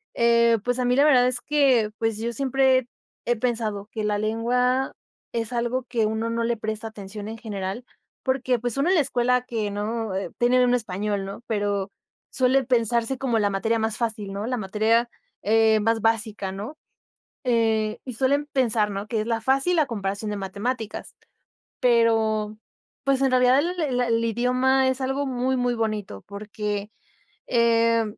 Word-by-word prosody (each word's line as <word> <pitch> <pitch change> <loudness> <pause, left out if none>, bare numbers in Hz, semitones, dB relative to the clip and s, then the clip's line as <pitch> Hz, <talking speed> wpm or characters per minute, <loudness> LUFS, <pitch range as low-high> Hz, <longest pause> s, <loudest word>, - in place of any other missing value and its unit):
eh, 235 0 +4
pues, 245 +1 0
a 250 - +1
mí 250 +1 +2
la 285 +2 +5
verdad 250 -4 +5
es 250 -1 +1
que 260 -6 +2
pues 225 -2 0
yo 235 +2 -3
siempre, 265 0 +2 0.4
he 240 0 +2
pensado 220 -4 -2
que 215 -2 -4
la 210 -1 0
lengua, 250 +4 0 0.4
es 230 +1 -3
algo 240 +2 -1
que 235 -3 0
uno 220 +1 -1
no 230 0 -1
le 235 0 0
presta 220 +1 -4
atención 205 0 -8
en 225 - -6
general, 205 +1 -5 0.4
porque 260 -2 0
pues, 245 -1 -3
uno 280 +6 +1
en 380 - +4
la 315 - +5
escuela 250 -1 +1
que 220 -4 -3
no, 215 +1 -3 0.3
tiene 250 +1 +3
uno 245 0 +3
español, 205 -2 -2
¿no?, 195 +4 -7
pero 205 -2 -1 0.4
suele 260 0 +2
pensarse 235 +1 +1
como 245 -4 0
la 205 -1 +2
materia 225 +4 0
más 220 0 -1
fácil, 215 -4 -3
¿no?, 205 +2 -4
la 250 0 -1
materia, 220 +4 +1 0.3
eh, 220 +1 +4
más 225 +1 +1
básica, 215 -3 0
¿no? 210 +10 -7 0.7
Eh, 225 -3 +1
y 255 -3 -6
suelen 280 +4 +1
pensar, 230 -6 +2
¿no?, 200 +2 -5
que 220 -2 -1
es - - -7
la 230 -1 0
fácil 275 +8 +2
a 295 - +2
comparación 205 -2 -3
de 205 - -3
matemáticas. 210 +4 -4 0.6
Pero, 225 -3 +2 0.5
pues 275 0 +1
en 265 -1 +2
realidad 255 +1 +5
el 350 +3 -1
el 260 -5 0
el 230 -1 +1
idioma 255 +3 +2
es 260 +1 -1
algo 270 +2 -1
muy, 260 0 -1
muy 245 -1 0
bonito 215 - -3
porque, 210 +1 -5 0.6
eh, 230 -1 +3
230 Hz, 170 wpm, -24 LUFS, 215-250 Hz, 0.7 s, la